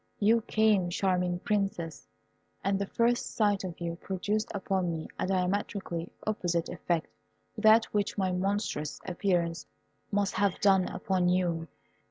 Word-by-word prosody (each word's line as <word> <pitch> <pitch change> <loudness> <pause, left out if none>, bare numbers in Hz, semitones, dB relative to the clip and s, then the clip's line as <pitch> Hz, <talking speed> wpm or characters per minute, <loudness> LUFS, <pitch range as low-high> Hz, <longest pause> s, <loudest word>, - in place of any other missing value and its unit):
You 225 +3 +4
came, 215 -5 +2
charming 180 -1 +1
Princess, 195 - -2 0.6
and 195 +1 +1
the 200 - -2
first 235 +3 +1
sight 205 -3 +2
of 180 -3 -6
you 170 -1 -3
produced 205 +4 -2
upon 190 -3 -1
me 160 -1 -4
a - - 0
diametrically 185 -2 -1 0.2
opposite 175 -6 -1
effect 170 -2 -1 0.5
to 215 - -7
that 220 +1 +7
which 205 0 0
my 190 -2 +1
monstrous 185 -5 -1
appearance 175 -2 0 0.4
must 200 -1 +1
have 200 -1 +1
done 190 -2 +4
upon 185 -2 0
you. 175 -2 +1
190 Hz, 140 wpm, -30 LUFS, 175-205 Hz, 0.6 s, that